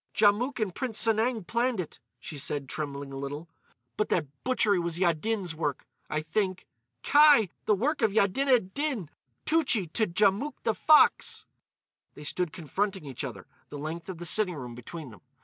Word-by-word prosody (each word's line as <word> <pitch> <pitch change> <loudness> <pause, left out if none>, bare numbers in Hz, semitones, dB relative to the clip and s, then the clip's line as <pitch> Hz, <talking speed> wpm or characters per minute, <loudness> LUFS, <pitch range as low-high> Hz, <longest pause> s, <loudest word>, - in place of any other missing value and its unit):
"Djamouk 220 +6 +3
and 210 -5 -1
Prince 240 -1 -2
Sanang 225 -1 +1
planned 235 +2 0
it," 170 - -6 0.2
she 155 - -8
said, 140 0 -1
trembling 140 -1 -5
a - - -6
little. 145 +4 -6 0.5
"But 210 - 0
that 165 - +1 0.2
butchery 220 -6 +2
was 170 -1 -2
Yaddin's 180 +2 0
work, 150 -3 -3 0.2
I 155 - -1
think. 185 +3 -2 0.4
Kai! 290 - +6 0.2
The 210 - +3
work 280 +9 -1
of 220 -2 +3
Yaddined 220 +1 +2
Din, 275 - -2 0.3
Tougtchi 260 - +2
to 220 -2 +2
Djamouk 205 +10 +1
the 225 - +1
Fox!" 305 +5 +4 0.7
They 150 - -10
stood 175 +2 -1
confronting 190 +3 -3
each 135 0 -5
other, 110 -9 -7 0.2
the 145 - -7
length 160 +4 -6
of 185 - -5
the 175 - -7
sitting 185 -1 +3
room 125 -4 -7
between 130 +4 -9
them. 105 - -15
190 Hz, 165 wpm, -28 LUFS, 155-225 Hz, 0.7 s, Kai